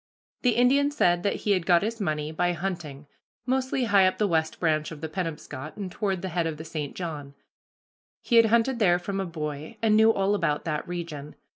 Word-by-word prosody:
The 245 -3 +2
Indian 275 +4 +4
said 175 -12 +2
that 200 - 0
he 210 - 0
had 185 -4 +1
got 175 -1 +5
his 225 +1 -3
money 155 -4 -2
by 175 +2 0
hunting, 170 -5 -5 0.4
mostly 260 0 0
high 200 -4 +5
up 185 - -1
the 210 - +2
West 160 -3 0
Branch 155 -2 +1
of 155 - -8
the 160 - -4
Penobscot, 155 -4 -6
and 195 -3 -5
toward 190 -1 -2
the 190 - -2
head 170 -1 0
of 160 -2 -4
the 160 - -8
St. 155 -3 -5
John. 150 -6 -6 0.8
He 235 - +2
had 230 -1 +7
hunted 235 +3 +2
there 175 -5 +4
from 195 +2 -4
a 190 - -2
boy, 155 +3 -6
and 215 -1 +3
knew 220 +1 +6
all 195 -1 +1
about 150 -7 0
that 150 -2 -3
region. 165 -4 -6
175 Hz, 210 wpm, -26 LUFS, 155-210 Hz, 0.8 s, had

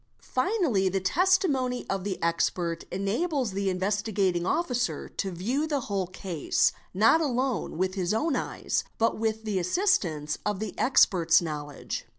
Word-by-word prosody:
* - - -42
Finally, 255 - +1
the 195 +1 0
testimony 270 - +1
of 195 -1 -2
the 195 -2 -3
expert 170 0 0
enables 235 - -1
the 195 0 -1
Investigating 190 -1 0
Officer 250 -8 -1
to 195 - -3
view 235 - -1
the 290 -3 -1
whole 200 -5 -2
case, 180 -4 0 0.2
not 225 - +4
alone 260 - -1
with 185 +1 0
his 185 -2 -1
own 280 +7 +1
eyes, - - -2
but 230 -1 +1
with 220 0 -1
the 210 -3 -1
assist 375 - +2
ance 150 -3 -4
of 210 -2 -1
the 220 - -4
expert's 175 -10 +4
knowledge. 150 -3 -5
200 Hz, 155 wpm, -27 LUFS, 185-255 Hz, 0.2 s, not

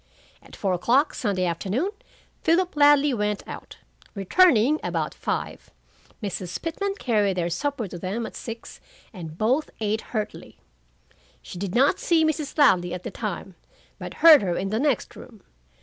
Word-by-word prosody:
At - - -14
four 195 -2 -1
o'clock 250 - +2
Sunday 200 -7 -1
afternoon, 195 - -1 0.5
Philip 350 +1 +2
Ladley 290 -1 +5
went 210 -2 -2
out, - - -9 0.4
returning 275 - +4
about - - -2
five. - - -4 0.5
Mrs. 185 -3 -4
Pitman 390 +5 -3
carried 210 - 0
their 170 -1 -1
supper 245 - -2
to 175 -1 -8
them 200 +6 -3
at - - -9
six, 230 -1 -8 0.3
and 165 -5 -8
both 255 +9 +1
ate 215 0 -1
heartily. 215 -2 -6 0.9
She 175 - -9
did 190 -1 -4
not 275 +8 +3
see 325 -2 +3
Mrs. 310 -1 -2
Ladley 180 - +4
at 180 - -8
the - - -5
time, 195 -2 -5 0.5
but - - -7
heard 315 -4 +10
her 180 -3 -1
in 195 - -2
the 215 +2 -1
next 285 -1 0
room. 220 -5 -13
220 Hz, 155 wpm, -24 LUFS, 190-290 Hz, 0.9 s, heard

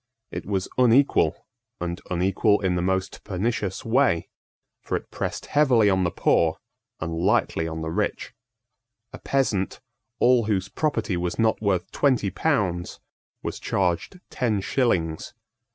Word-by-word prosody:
It - - -6
was 95 -2 -1
unequal, 125 +3 +3 0.3
and 85 +1 -4
unequal 95 +4 +2
in 95 -2 +1
the 90 - 0
most 95 +1 -1
pernicious 100 0 -2
way: 115 -8 +2 0.5
for - - -3
it - - -12
pressed - - -4
heavily 125 -8 +4
on 95 -1 +2
the - - +2
poor, 85 - +2 0.4
and 80 0 -3
lightly 80 0 +1
on 80 0 -5
the 80 - -3
rich. - - -2 0.8
A - - -8
peasant, 115 -9 0 0.4
all 125 -2 +4
whose 100 -3 -1
property 115 - -1
was 85 0 -2
not 110 -1 +2
worth 95 -4 0
twenty 125 -9 +2
pounds, 95 - -1 0.4
was - - -4
charged 95 - -1
ten 110 -5 0
shillings. 95 -6 -1
100 Hz, 135 wpm, -25 LUFS, 90-120 Hz, 0.8 s, heavily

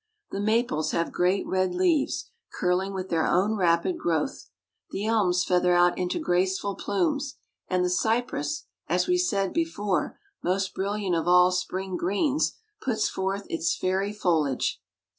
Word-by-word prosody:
The 195 - -3
maples 205 -8 +1
have 170 - 0
great 185 +2 +1
red 185 -1 0
leaves, 335 -6 +1 0.2
curling 185 +1 0
with 190 -1 -5
their 165 -1 +1
own 200 +5 +2
rapid 180 - +1
growth; 175 - -1 0.4
the 200 - -4
elms 200 -5 +2
feather 180 -1 +3
out 175 0 +4
into 180 - -1
graceful 190 - 0
plumes; 280 - -1 0.3
and 180 -1 +1
the - - +1
cypress, 250 +9 0 0.2
as - - +1
we 360 0 +2
said 200 - 0
before, 210 - -1 0.2
most 190 +1 0
brilliant 200 -1 -1
of 165 +1 -1
all 180 0 +6
spring 185 0 -2
greens, 265 - +1 0.3
puts 220 -4 0
forth 195 +1 -2
its 165 0 -1
fairy 190 +2 0
foliage. 160 -10 0
190 Hz, 145 wpm, -26 LUFS, 180-220 Hz, 0.4 s, all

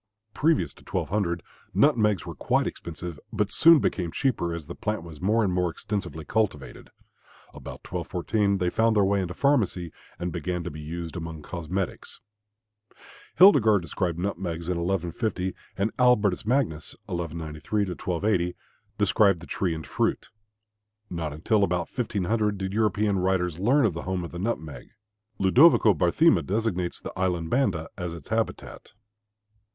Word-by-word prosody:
Previous 160 +1 +1
to - - -19
1200 90 -5 -1 0.3
nutmegs 105 - +3
were - - -6
quite - - +1
expensive, 85 -1 -6
but 105 -2 -1
soon 165 0 +7
became 90 - -1
cheaper 120 -10 0
as 85 -2 -5
the 85 - -7
plant 105 -3 -3
was 80 -2 -11
more 110 +4 +2
and 95 -3 0
more 90 -1 +1
extensively 85 -5 -4
cultivated. 95 -11 -2 0.6
About - - -9
1214 100 +3 -1
they 90 -2 0
found 115 0 +2
their 105 - +4
way 100 0 +2
into 90 -1 -4
pharmacy 105 - +1 0.3
and 90 0 -3
began 85 +1 -3
to 85 - -5
be 75 - -8
used 85 +2 -6
among 80 -2 -6
cosmetics. 90 +3 -4 1.2
Hildegard 110 - +6
described 85 0 -2
nutmegs 85 -2 -3
in 90 -1 0
1150, 90 +2 -1 0.2
and 100 +3 0
Albertus 105 -6 +3
Magnus 115 - 0
(1193 85 0 -3
1280) 90 0 -1 0.4
described 100 -2 +3
the 85 - -11
tree 90 -2 -1
and 80 - -7
fruit. - - -1 0.8
Not 80 -3 -3
until 100 +8 +1
about 90 -2 0
1500 105 -2 0
did 95 0 -4
European 105 -2 +1
writers 90 -3 0
learn 120 +4 +3
the 85 - -6
home 95 -1 -3
of 85 - -7
the 85 - -6
nutmeg. 90 -8 -4 0.4
Ludovico 110 - +6
Barthema 90 - +3
designates 95 -4 -1
the - - -7
island 90 -3 -1
Banda 120 -12 +1
as 90 -2 -4
its 80 - -12
habitat. 110 0 -3
90 Hz, 145 wpm, -26 LUFS, 85-105 Hz, 1.2 s, soon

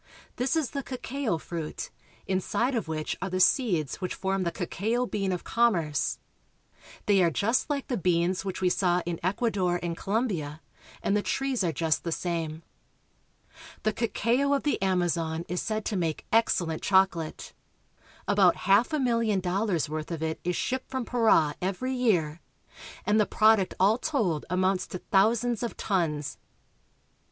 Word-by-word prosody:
This 255 +5 0
is 310 -7 0
the 280 - -3
cacao 255 -5 -3
fruit, 160 -1 -6 0.3
inside 195 +7 0
of 230 -8 -1
which 155 -1 -3
are 195 - -2
the 185 0 -2
seeds 185 - +2
which 185 - -3
form 190 0 -1
the 170 -2 0
cacao 215 +8 -1
bean 195 -5 -2
of 180 - -3
commerce. 175 -12 +1 0.9
They 200 -2 +4
are 170 - +4
just 220 - 0
like 285 -2 -2
the 250 - -1
beans 180 +1 +1
which 190 -1 -4
we 185 - +3
saw 180 -1 +1
in 170 -1 -3
Ecuador 185 -2 0
and 170 -1 -2
Colombia, 185 - -2 0.4
and 200 - +1
the 210 - +2
trees 270 -1 -1
are 170 - +1
just 160 +1 0
the 170 - -3
same. 165 -2 -3 1.2
The 215 - +1
cacao 235 +5 +1
of 275 - -2
the 290 - 0
Amazon 170 -3 0
is 180 +1 -2
said 215 -1 -2
to 215 - -1
make 165 -4 -2
excellent 175 -8 +2
chocolate. 190 -5 +1 0.7
About 195 -3 +5
half 200 - +4
a - - +2
milHon 230 -6 +1
dollars' 185 -1 0
worth 155 0 -4
of 165 -2 -4
it 160 0 -2
is 180 0 -1
shipped 260 +1 -2
from 260 -2 -3
Para 220 -11 +3
every 200 +8 -2
year, 175 -11 +1 0.6
and 210 +1 +3
the 210 - +3
prod 220 0 +5
uct 190 - -2
all 205 +6 +4
told 215 - -1
amounts 185 +1 +1
to - - -5
thousands 225 +5 +2
of 235 - -4
tons. 160 -7 -1
190 Hz, 165 wpm, -28 LUFS, 170-230 Hz, 1.2 s, About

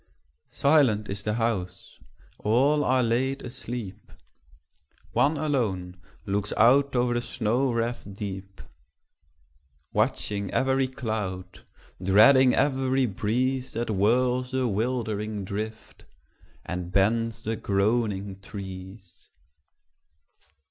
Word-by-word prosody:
Silent 135 -8 +3
is 100 0 -4
the 105 +1 -2
house: 105 -6 -3 0.4
all 135 +8 +3
are 130 -1 +2
laid 130 +4 0
asleep: 120 -4 -7 1.0
One 150 +2 +2
alone 100 -12 -2 0.2
looks 100 +1 -1
out 140 +3 +4
o'er 120 0 +2
the 120 - 0
snow 120 +3 0
wreaths 115 +1 -2
deep, 95 -1 -7 1.3
Watching 100 -1 0
every 130 0 +1
cloud, 105 -8 -5 0.4
dreading 125 +7 +6
every 130 -1 +2
breeze 125 +5 -1
That 115 +1 -3
whirls 125 +5 +2
the 130 -1 +1
wildering 110 -2 -2
drift, 110 +3 -6 0.6
and 90 -1 -5
bends 110 +4 +1
the 110 +1 -2
groaning 100 -1 0
trees. 95 -2 -10
110 Hz, 95 wpm, -26 LUFS, 100-130 Hz, 1.3 s, dreading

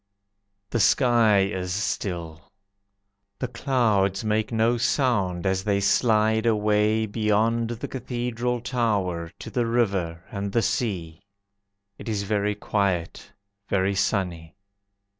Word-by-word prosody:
The 120 - 0
sky 115 -3 +4
is 95 -2 -2
still. 90 -4 -4 0.9
The 125 - -3
clouds 110 -7 +1
make 110 +1 0
no 115 +1 +2
sound 105 - +1
As 95 0 0
they 100 -1 +1
slide 110 +2 +2
away 105 0 +2
Beyond 110 +2 +1
the 120 -1 -5
Cathedral 125 -1 -3
Tower, 100 -9 -1
To - - -8
the 120 -2 0
river, 95 -8 0
And 100 -1 -4
the 115 - +2
sea. 85 -9 -2 0.8
It - - -7
is 105 -2 -1
very 105 0 0
quiet, 100 -5 -2 0.4
Very 95 0 +1
sunny. 90 -5 -1
105 Hz, 115 wpm, -25 LUFS, 95-115 Hz, 0.9 s, sky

